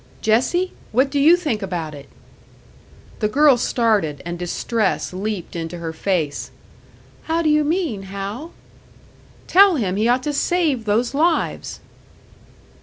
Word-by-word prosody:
"Jessie! 260 +12 +1 0.2
What 260 +4 +2
do 285 - 0
you 320 +5 +6
think 295 -12 -2
about 175 -5 -4
it?" 140 -1 -11 1.1
The 210 - +1
girl 285 +5 +5
started, 215 - 0
and 175 0 -5
distress 190 +3 -1
leaped 195 -2 -4
into 165 +1 -5
her 165 -1 -5
face. 160 -4 -2 0.8
"How 330 +1 0
do 310 - +2
you 300 0 +3
mean, 305 - -1
Hal?" 200 - -6 0.9
"Tell 390 -1 +6
him 195 -8 -1
he 215 +2 +2
ought 250 +1 +2
to 295 - -2
save 295 -6 0
those 225 +5 +1
lives!" 325 +4 0
230 Hz, 135 wpm, -21 LUFS, 185-300 Hz, 1.1 s, you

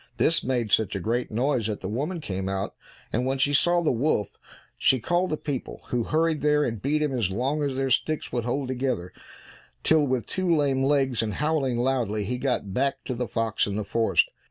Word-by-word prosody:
This 165 - +3
made 120 -4 -1
such 110 -1 +2
a - - -1
great 120 +7 -1
noise 120 0 0
that 105 -2 -4
the 95 - -4
woman 150 - -3
came 95 -5 -3
out, 95 0 -2 0.4
and 120 - +1
when 135 +1 0
she 140 +2 +2
saw 175 +4 +4
the 155 - +3
wolf 120 - 0 0.4
she 130 - +3
called 175 +8 +1
the 155 - -1
people, 145 -4 -5
who 120 -2 0
hurried 160 -1 +1
there, 150 0 +3
and 115 -6 -3
beat 150 +3 +1
him 150 - 0
as 115 -7 0
long 130 +9 -1
as 140 -2 -1
their 135 0 -1
sticks 155 +4 0
would 120 -2 0
hold 130 +3 -1
together, 125 -8 -2 0.7
till 155 -2 +4
with 130 -3 0
two 185 -3 +1
lame 140 -3 +1
legs, 135 -4 +2
and 110 -2 -2
howling 150 -5 0
loudly, 120 -4 0
he 125 +5 -3
got 125 -8 -1
back 135 +2 0
to 130 - -2
the 125 0 -3
fox 115 0 0
in 100 - -3
the 105 -1 -2
forest. 115 +2 +2
130 Hz, 215 wpm, -26 LUFS, 115-145 Hz, 0.7 s, saw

